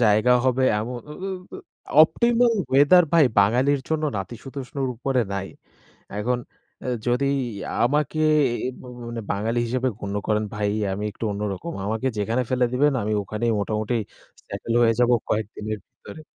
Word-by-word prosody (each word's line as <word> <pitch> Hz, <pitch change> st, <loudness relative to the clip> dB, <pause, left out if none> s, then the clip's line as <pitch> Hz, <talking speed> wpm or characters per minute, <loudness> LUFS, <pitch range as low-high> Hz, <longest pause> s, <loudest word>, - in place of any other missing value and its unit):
জায়গা 110 Hz, +2 st, +4 dB
হবে 130 Hz, 0 st, +2 dB, 0.2 s
এমন 120 Hz, +3 st, -4 dB
উ -, -, -6 dB
উ -, -, -3 dB, 0.3 s
অ -, -, -5 dB, 0.5 s
অপটিমাল 235 Hz, +8 st, +3 dB, 0.2 s
ওয়েথার 145 Hz, +7 st, +6 dB
ভাই 165 Hz, -3 st, +6 dB
বাঙালির 125 Hz, +8 st, +3 dB
জন্য 155 Hz, -1 st, 0 dB
নাতিশীতোষ্ণর 130 Hz, +6 st, -5 dB
উপরে 130 Hz, +1 st, 0 dB
নাই। 95 Hz, 0 st, -3 dB, 0.7 s
এখন 120 Hz, +4 st, 0 dB, 0.5 s
এ -, -, -3 dB, 0.2 s
যদি 125 Hz, +3 st, +2 dB, 0.6 s
আমাকে 150 Hz, +4 st, +1 dB, 0.5 s
এ -, -, 0 dB
ভ -, -, -12 dB, 0.3 s
মানে, 115 Hz, -1 st, -5 dB
বাঙালি 110 Hz, +4 st, -1 dB
হিসেবে 125 Hz, +2 st, -1 dB
গণ্য 100 Hz, 0 st, -4 dB
করেন 105 Hz, 0 st, +1 dB
ভাই, 105 Hz, 0 st, 0 dB, 0.2 s
আমি 105 Hz, +2 st, -4 dB
একটু 115 Hz, -, -9 dB
অন্যরকম। 105 Hz, -, -4 dB
আমাকে 110 Hz, +5 st, -1 dB
যেখানে 115 Hz, +5 st, 0 dB
ফেলে 125 Hz, -1 st, +2 dB
দিবেন, 145 Hz, +3 st, +3 dB
আমি 105 Hz, -, -2 dB
ওখানেই 110 Hz, +4 st, -1 dB
মোটামুটি 110 Hz, +3 st, -1 dB, 0.5 s
সেটেল 115 Hz, -, -4 dB
হয়ে 115 Hz, -1 st, +5 dB
যাবো 125 Hz, 0 st, +4 dB, 0.2 s
কয়েকদিনের 110 Hz, 0 st, -2 dB
ভিতরে। 160 Hz, -, -12 dB
120 Hz, 150 wpm, -24 LUFS, 105-135 Hz, 0.7 s, ওয়েথার